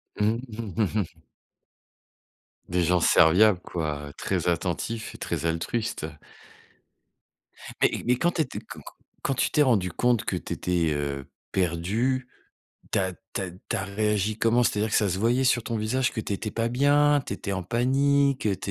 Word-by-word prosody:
Mmh, 110 +2 +1 0.2
mmh 110 -2 -2
mh. 100 -6 -2 1.5
Des 90 0 +1
gens 90 +2 +3
serviables, 90 +4 +5
quoi, 75 -5 -4
très 90 -3 -1
attentifs 90 +7 -2
et - - -9
très 85 -2 -3
altruistes. 85 +5 -2 1.8
Mais - - +2
mais 125 +1 +3
quand 175 +6 +2
tu 170 - 0
étais 145 - -3
q - - -19
q - - -13 0.4
quand 135 - 0
tu - - +1
t'es 150 - +3
rendu 105 -10 +3
compte 120 +4 +1
que 95 - -2
tu - - -5
étais, 85 -3 0
heu, 70 -2 -3 0.2
perdu, 105 +9 0 0.6
tu - - +2
as 95 -1 0 0.2
tu - - -1
as 95 -2 -3
tu 90 +2 -5
as 95 - -2
réagi 105 +1 0
comment? 115 +2 +3
C'est-à-dire 110 -2 +1
que - - +2
ça 105 - +3
se 95 0 -1
voyait 120 +5 +2
sur 125 -2 +3
ton 115 - -3
visage, 120 +4 0
que 115 - -2
tu 105 - -4
étais 105 +2 -3
pas 115 +1 -1
bien? 145 +3 +4
Tu - - -4
étais 100 - -4
en 90 - -2
panique? 135 +6 +2
Tu 105 - +1
es 95 - 0
105 Hz, 180 wpm, -26 LUFS, 90-120 Hz, 1.8 s, serviables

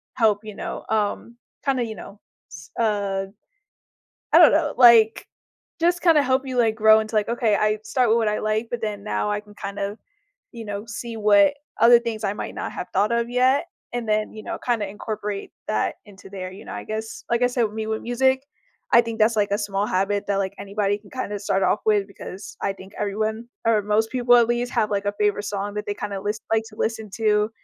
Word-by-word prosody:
help, 220 -3 +2
you 215 -2 -8
know, - - -6
um, 220 +2 -1 0.3
kinda, 265 -3 +1
you 220 -1 -6
know, 200 +2 -11 0.3
s - - -11
uh, 200 -3 0 1.1
I - - +8
don't 335 -3 +9
know, 300 -1 +1
like, 230 -3 +6 0.5
just 350 +1 +2
kinda 325 -5 +5
help 260 +1 +1
you, 255 -1 -3
like, 225 -2 +3
grow 220 0 +6
into, 215 +1 -6
like, 210 - +1
"Okay. 230 -3 +1
I 215 +1 +1
start 250 +1 +1
with 230 - +4
what 225 -2 +1
I 210 - 0
like, 215 +2 -1
but 240 - -3
then 210 -2 -3
now 210 0 -1
I 205 0 -1
can 210 0 -18
kinda, 200 +1 -5 0.5
you 230 -1 -8
know, 205 0 -5
see 230 +1 -6
what 210 +5 +4 0.2
other 235 +1 +7
things 230 -2 -4
I 200 +1 0
might - - -6
not - - -5
have - - -6
thought 205 +4 +2
of 235 0 0
yet." 255 +3 +3 0.3
And 240 -1 -3
then, 215 0 0
you 215 - -8
know, - - -4
kinda 230 -4 -1
incorporate 205 0 -5 0.2
that 215 - 0
into 200 -1 -14
there, 185 -2 -6
you 190 - -11
know, - - -7
I - - -6
guess. 220 +1 -6
Like 235 0 +2
I 245 - +6
said, 245 -1 0
with 215 - -3
me 220 0 -3
with 220 0 -2
music, 260 +2 +1 0.5
I - - +8
think 230 -1 -6
that's, 220 +1 +3
like, 205 -1 +1
a - - +3
small 205 -1 -1
habit 200 +2 0
that, 200 -1 0
like, 195 0 -1
anybody 200 0 -1
can 205 -1 -19
kinda 210 -5 -4
start 195 -1 0
off 210 - +2
with 205 -2 +3
because 195 0 -9
I 195 - 0
think 190 +1 -13
everyone 215 +3 -2 0.2
or 225 -2 +4
most 210 +2 +1
people 245 -1 +4
at 235 -1 +4
least 240 0 -1
have, 215 - +1
like, 200 0 -1
a 205 - +1
favorite 205 0 +1
song 205 0 -3
that 210 0 -4
they 205 - -2
kinda 200 -1 -5
list 210 +2 -3
like 220 0 +2
to 215 - -16
listen 220 -1 -2
to. 210 -1 +2
215 Hz, 225 wpm, -23 LUFS, 205-235 Hz, 1.1 s, don't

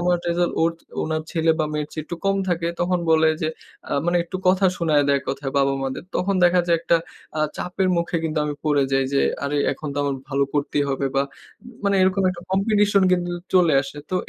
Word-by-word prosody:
আমার 175 0 +2
রেজাল্ট 175 0 +1
ওর, 165 - +3 0.3
ওনার 155 0 -2
ছেলে 165 -1 +2
বা 155 - +1
মেয়ের 150 -1 -2
চেয়ে 155 - -4
একটু 175 - -4
কম 195 0 +2
থাকে 170 -1 0
তখন 180 0 +1
বলে 160 0 +5
যে 155 - +1 0.4
আ - - -1
মানে 175 0 +2
একটু 185 - -5
কথা 190 +1 +4
শুনাইয়া 155 -4 +2
দেয় 140 - +4
এককথায় 135 0 -4
বাবা-মা 135 -1 +1
দের। - - -8
তখন 195 +2 0
দেখা 175 0 +5
যায় 170 - +3
একটা 170 0 +3 0.4
আ - - +1 0.2
চাপের 185 +1 -1
মুখে 170 0 -1
কিন্তু 155 -1 -1
আমি 150 0 -2
পড়ে 145 -2 +3
যাই, 135 0 +3
যে 140 - +3 0.2
আরে 145 +1 -1 0.2
এখন 155 - -7
তো - - -2
আমার 140 -1 0
ভালো 140 0 +1
করতেই 145 0 0
হবে 135 0 -1
বা 135 - +4 0.4
উম 245 - -11
মানে 200 - +2
এরকম 190 +1 +2
একটা 175 -1 -8
Competition 205 0 +3
কিন্তু 175 -1 0 0.2
চলে 175 -4 +5
আসে। 140 +1 -9
তো - - -1
170 Hz, 220 wpm, -22 LUFS, 145-180 Hz, 0.4 s, বলে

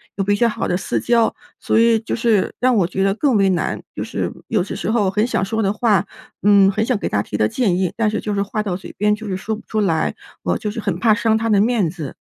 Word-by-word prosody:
有 195 - -1
比 205 +1 +2
较 235 +3 +3
好 225 - -2
的 180 - 0
私 195 - -2
交。 235 -2 +2 0.3
所 - - +1
以 230 -1 +4
就 225 - -4
是， 225 -4 +1
让 255 0 +3
我 195 -5 +3
觉 190 +2 -2
得 195 - +2
更 270 -1 +1
为 195 -1 +3
难， 175 -2 -1
就 - - -3
是 - - -3 0.2
有 210 -5 +1
些 195 - -6
时 - - -2
候 210 -5 +2
很 210 +3 +1
想 235 -6 -1
说 220 +2 -1
的 195 - +2
话， 210 -4 +2 0.4
嗯， 200 -1 +6
很 215 +3 -1
想 250 -1 +1
给 - - -3
她 100 - +1
提 105 - -5
的 105 - +2
建 195 - 0
议， 185 -2 0
但 225 -2 +1
是 215 - -2
就 210 - -3
是 200 - 0
话 215 +2 -3
到 195 -4 -2
嘴 185 - -9
边 210 +1 +2
就 215 0 -9
是 185 -1 -2
说 220 +3 -3
不 215 - -11
出 220 - -2
来， 170 -6 +1 0.3
我 - - 0
就 210 - -4
是 225 - -5
很 195 -5 -2
怕 220 0 +4
伤 225 -1 +2
她 225 0 -1
的 205 -2 +4
面 220 -6 +2
子。 155 -6 -7
210 Hz, 305 characters per minute, -20 LUFS, 195-225 Hz, 0.4 s, 嗯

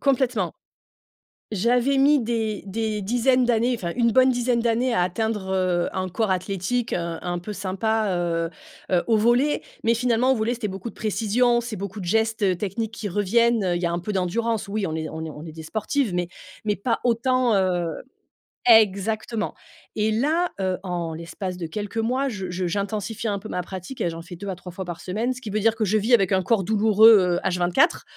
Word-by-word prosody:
Complètement! 250 -9 +1 1.0
J'avais 245 +6 +2
mis 285 +2 +5
des 225 -3 -2
des 215 +1 -2
dizaines 245 +4 +2
d'années, 240 +1 +2
enfin, 175 -7 -4
une 235 -2 +3
bonne 260 +2 +5
dizaine 245 -1 +1
d'années 235 +2 +1
à 180 - +2
atteindre, 200 +1 -2
heu, 180 -2 +1
un 185 0 -2
corps 205 +2 0
athlétique, 195 +6 -1
heu, - - +1 0.3
un 175 0 -2
peu 210 +4 -6
sympa, 205 +3 -1
heu 165 -1 -1 0.4
heu, 180 -2 +3
au 225 -2 +4
volley 240 +7 +2 0.2
mais 230 - +3
finalement, 245 +2 +2
au - - +3
volley, 225 +2 0
c'était 230 -3 -3
beaucoup 190 +3 -6
de - - -16
précision, 230 +3 +1
c'est 235 -2 -5
beaucoup 200 +1 -6
de 185 - -6
gestes, 225 +4 +1
heu, 185 -2 +3
techniques 210 +4 -3
qui 220 -2 -5
reviennent, 225 +3 +2
heu, 180 -1 +1
il 175 - -2
y - - 0
a 170 - 0
un 170 - -1
peu 195 +5 -4
d'endurance. 215 +4 -1
Oui, 205 -2 -2
on 160 - -3
est 160 -1 -3
on 160 0 -6
est 160 - -5
on 150 +2 -9
est 160 - -8
des 160 0 -9
sportives 220 - -1
mais 175 -1 -1 0.4
mais 210 - +1
pas 230 +5 -1
autant, 245 0 +2
heu 175 -4 0 0.7
exactement 215 +1 +3 0.4
et 215 0 +1
là, 315 +10 +1
heu, 185 -1 0
en 175 -3 -3
l'espace 180 +3 -5
de 170 - -4
quelques 205 +6 -6
mois, 255 +5 0
je 190 -7 -5
je 180 +1 -2
j'intensifie 205 +4 -3
un 200 -2 -1
peu 215 - -9
ma 180 - -2
pratique 190 +8 -8
et - - +1
j'en 165 0 -7
fais 175 +1 -10
2 200 +3 -7
à 190 - -2
3 180 0 -10
fois 190 +2 -6
par 175 -1 -6
semaine, 220 +7 -2
ce 255 - -8
qui 220 - -7
veut 210 - 0
dire 225 +1 +3
que 220 -1 -1
je 215 +2 +2
vis 225 +4 +3
avec 195 -6 +4
un 190 - +3
corps 215 0 +2
douloureux, 220 +2 +6 0.3
heu, - - -4
H24 180 - +2
215 Hz, 215 wpm, -24 LUFS, 185-235 Hz, 1.0 s, douloureux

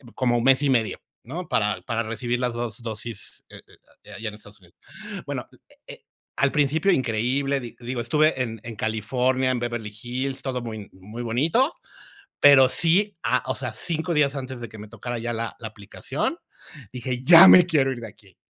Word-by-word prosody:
como 120 -2 +1
mes 135 +3 +4
y 145 - +1
medio, 115 -5 +1 0.3
¿no?, 165 +7 -6
para 105 -1 0
para 115 0 -2
recibir 120 +2 -3
las 125 -1 -1
2, 120 -1 -5
dosis, 115 -1 -7
eh - - -12
eh, - - -20 0.3
de - - -14
ahí - - -9
allá 115 - -3
en 105 - -11
Estados 105 -1 -16
Unidos. 85 -2 -23 0.5
Bueno, - - -5
al - - -21
eh - - -24
eh, - - -12 0.3
al 140 -1 +2
principio 150 +5 +2
increíble, 130 - 0
di 120 -2 -9
digo, 120 +1 -4
estuve 155 +1 +2
en 115 -3 -4
en 115 -1 -7
California, 125 +4 0
en 125 - -1
Beverly 120 -3 -4
Hills, 130 +2 -3
todo 130 -2 -3
muy 110 -3 -7
muy 105 +6 -9
bonito, 160 - +1 0.7
pero, 135 -2 +7
sí, 180 +5 +2
ah, 125 +2 +1
o 130 - -1
sea, 120 -4 -4
5 160 +6 -3
días 145 -2 +2
antes 130 -2 -6
de 120 - -6
que 110 - -13
me 105 +1 -10
tocara 120 +2 -6
ya 120 +1 -3
la 115 0 -4
la 110 - -6
aplicación, 105 -2 -4 0.5
dije: 125 0 -4
"¡Ya 170 +5 +10
me 180 - +9
quiero 140 -6 +2
ir 125 - -7
de 115 - -7
aquí". 100 -4 -20
125 Hz, 200 wpm, -24 LUFS, 115-135 Hz, 0.7 s, Ya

